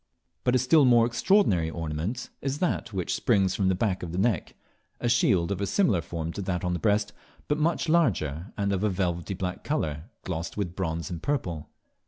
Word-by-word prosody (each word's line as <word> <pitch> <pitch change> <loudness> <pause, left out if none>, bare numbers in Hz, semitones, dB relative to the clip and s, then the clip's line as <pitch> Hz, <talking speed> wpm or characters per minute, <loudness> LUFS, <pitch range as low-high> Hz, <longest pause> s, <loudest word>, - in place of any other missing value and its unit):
But 125 0 +2
a - - +6
still 130 +5 +4
more 120 -3 +6
extraordinary 115 - +3
ornament 85 +9 -4
is 135 +1 -2
that 175 -8 -1
which 95 -4 -2
springs 95 -5 +2
from 95 - +1
the 95 - +3
back 95 -1 0
of 85 - -5
the 90 - -4
neck, 100 -4 0 0.4
a - - -1
shield 100 -7 +3
of 100 0 -2
a 100 - 0
similar 165 - +2
form 80 0 -5
to - - -4
that 90 -2 -2
on 90 0 0
the 90 - -2
breast, 105 -1 +1 0.3
but 150 +1 0
much 165 +2 +1
larger, 100 - +1
and 100 -1 0
of 95 +1 -1
a 105 - +3
velvety 90 -1 -2
black 90 0 -4
colour, 80 - -2 0.2
glossed 85 0 -4
with 90 -4 -3
bronze 85 -1 -3
and 85 -2 -5
purple. 90 - -2
95 Hz, 205 wpm, -27 LUFS, 85-120 Hz, 0.4 s, a